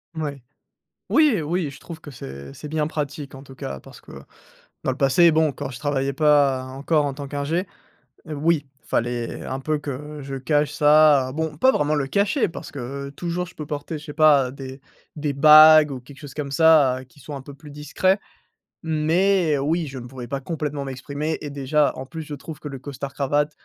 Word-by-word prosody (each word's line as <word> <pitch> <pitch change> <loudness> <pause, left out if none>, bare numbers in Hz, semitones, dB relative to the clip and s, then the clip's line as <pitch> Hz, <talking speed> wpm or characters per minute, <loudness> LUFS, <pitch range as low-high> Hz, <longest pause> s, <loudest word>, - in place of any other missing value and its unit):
Ouais. 145 -5 -4 0.7
Oui 295 - +4
oui, 160 0 -1
je - - -13
trouve 165 -2 -9
que 145 - -11
c'est 70 - -9
c'est 150 - -9
bien 155 -1 0
pratique 145 -2 -5
en 135 - -10
tout 135 -1 -14
cas 70 - -6
parce - - -14
que - - -15 0.7
dans 130 - +1
le 130 - -6
passé 160 +5 +5
bon, 155 -1 +3
quand 130 - -6
je 120 - -9
travaillais 140 -2 -1
pas 145 -3 +3
encore 140 +4 0
en 140 - -2
tant 140 -1 -6
qu'ingénieur 150 +6 -2 0.6
oui, 155 0 0 0.2
il - - -24
fallait 120 0 -2
un 130 +1 -4
peu 155 +2 -1
que 145 +1 -7
je 135 0 -6
cache 145 +2 +1
ça, 150 -3 +5
bon, 160 -1 -3
pas 260 +9 +5
vraiment 150 +1 +1
le 135 -2 -1
cacher 200 - +1
parce 165 - -9
que 140 +1 -6
toujours 175 +4 -3
je 180 - -14
peux 150 - -6
porter 150 +1 -4
je 150 - -13
sais 150 - -7
pas, 145 -4 +5
des 135 0 -9 0.4
des 145 -1 -2
bagues 155 +1 +8
ou 130 - -5
quelque 135 +3 -15
chose 145 -2 -10
comme 140 -2 -5
ça 140 -4 +5
qui 145 - -21
soit 145 0 -8
un 135 - -7
peu 140 - -11
plus 150 +2 -14
discret. 185 +7 0 0.6
Mais 160 +1 +2
oui, 155 +3 0
je 135 -1 -8
ne 120 - -7
pourrais 125 -2 -8
pas 140 - -3
complètement 145 -1 -4
m'exprimer 140 +4 -4
et 145 - -5
déjà 140 +1 +1
en 130 - -6
plus 160 0 -7
je 150 - -8
trouve 150 +2 -9
que 150 - -7
le 135 -2 -7
costard 140 0 -7
cravate, 145 +2 0
145 Hz, 210 wpm, -23 LUFS, 135-155 Hz, 0.7 s, bagues